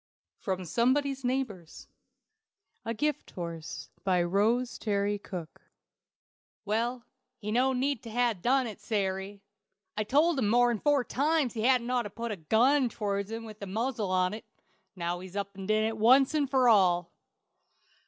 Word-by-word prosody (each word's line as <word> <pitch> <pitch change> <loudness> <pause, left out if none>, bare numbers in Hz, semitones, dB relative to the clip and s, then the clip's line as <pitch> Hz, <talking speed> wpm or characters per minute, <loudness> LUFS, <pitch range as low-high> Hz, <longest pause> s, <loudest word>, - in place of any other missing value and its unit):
From 185 -2 -3
Somebody's 265 - +1
Neighbors. 245 -10 -3 1.0
A 230 - -2
GIFT 295 +4 -1
HORSE. 170 -3 -6
BY 180 -2 +2
ROSE 220 +8 +1
TERRY 205 -1 0
COOKE. 180 -5 -8 1.0
"Well, 235 +4 -1 0.3
he 210 -1 -5
no 255 +4 +3
need 265 0 -1
to 230 - -9
ha' 240 +1 +1
done 260 +4 +2
it, 220 -3 -7
Sary. 200 -1 -3 0.5
I've 215 0 -2
told 300 +3 +3
him 210 -5 +1
more'n 240 -1 +3
four 290 0 +2
times 290 -1 0
he 225 - -3
hadn't 250 0 +2
ought 250 -1 +2
to 205 - -6
pull 230 +3 -5
a - - -2
gun 245 - +3
tow'rds 200 -2 -3
him 225 0 -5
by 220 - -8
the 205 -1 -9
muzzle 220 +1 -2
on't. 185 +3 0 0.5
Now 175 -1 -3
he's 185 +1 -10
up 200 -1 -4
an' 190 -1 -7
did 215 0 +2
it 220 0 -1
once 260 +6 +5
for 260 -2 +3
all." 180 -6 +4
220 Hz, 155 wpm, -29 LUFS, 200-250 Hz, 1.0 s, once